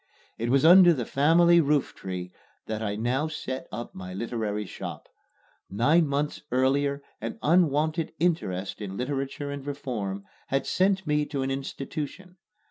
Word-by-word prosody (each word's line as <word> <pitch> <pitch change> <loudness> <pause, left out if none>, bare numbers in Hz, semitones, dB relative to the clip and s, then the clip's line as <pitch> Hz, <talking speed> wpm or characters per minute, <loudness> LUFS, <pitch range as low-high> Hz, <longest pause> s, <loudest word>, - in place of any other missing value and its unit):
It 115 +1 -1
was 135 +4 +3
under 175 0 +8
the 120 -4 -3
family 170 +6 +5
rooftree 95 - -1 0.3
that 110 0 -4
I 105 -2 -2
now 125 +7 0
set 130 -4 -5
up 120 +2 -6
my 90 0 -8
literary 105 -1 -2
shop. - - -7 0.6
Nine 150 - +3
months 145 +1 -1
earlier 140 +2 +1 0.2
an 115 +1 -4
unwonted 160 0 +2
interest 110 - -1
in 100 -1 -5
literature 135 +2 -3
and 140 -1 -6
reform 115 -9 -4 0.2
had 135 0 0
sent 190 0 +1
me 150 -1 +1
to 140 -3 -2
an 135 - -1
institution. 145 +6 -5
140 Hz, 140 wpm, -27 LUFS, 115-155 Hz, 0.6 s, under